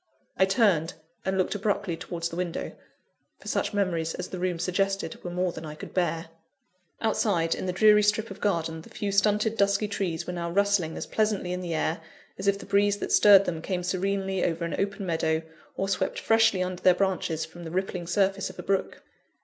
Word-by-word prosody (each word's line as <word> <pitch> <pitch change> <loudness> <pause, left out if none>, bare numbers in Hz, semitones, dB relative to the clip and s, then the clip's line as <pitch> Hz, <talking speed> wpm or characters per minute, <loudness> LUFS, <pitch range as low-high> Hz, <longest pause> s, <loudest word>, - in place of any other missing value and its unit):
I 190 - +4
turned, 190 -6 +2 0.3
and 190 0 0
looked 185 - +1
abruptly 200 -3 -1
towards 170 0 -4
the 165 - -7
window; 175 -1 -3 0.7
for - - -14
such - - 0
memories 175 -6 -1
as - - -5
the 185 - -6
room 180 -1 -1
suggested 195 0 -1
were 175 - -4
more 180 0 -1
than 160 - -8
I 155 -1 -7
could - - -10
bear. 165 -3 -1 0.7
Outside, 200 -7 +1
in - - -4
the - - +1
dreary 210 +3 +6
strip 210 +2 +1
of - - -10
garden, 165 -5 -1
the - - -15
few 205 -1 -3
stunted, 210 +2 +2
dusky 200 +1 +2
trees 190 -5 -2
were 180 - -4
now 170 -1 -3
rustling 200 -3 +1
as - - -4
pleasantly 210 -4 0
in 180 - -3
the 170 -2 -3
air, 160 +1 -1 0.4
as 195 - -3
if 200 0 +3
the - - -10
breeze 205 0 +2
that - - -4
stirred 200 -1 +7
them 165 -2 -3
came 180 0 -2
serenely 190 +1 -1
over 170 0 0
an 170 - -4
open 200 0 -2
meadow, 160 -2 0 0.3
or 195 - -1
swept 195 - -1
freshly 225 -4 +3
under 185 0 -5
their 185 -1 +5
branches 180 -4 0
from 175 - -12
the 165 - -6
rippling 180 0 -3
surface 195 +1 +1
of - - -12
a - - -6
brook. 195 0 -1
185 Hz, 205 wpm, -27 LUFS, 170-200 Hz, 0.7 s, stirred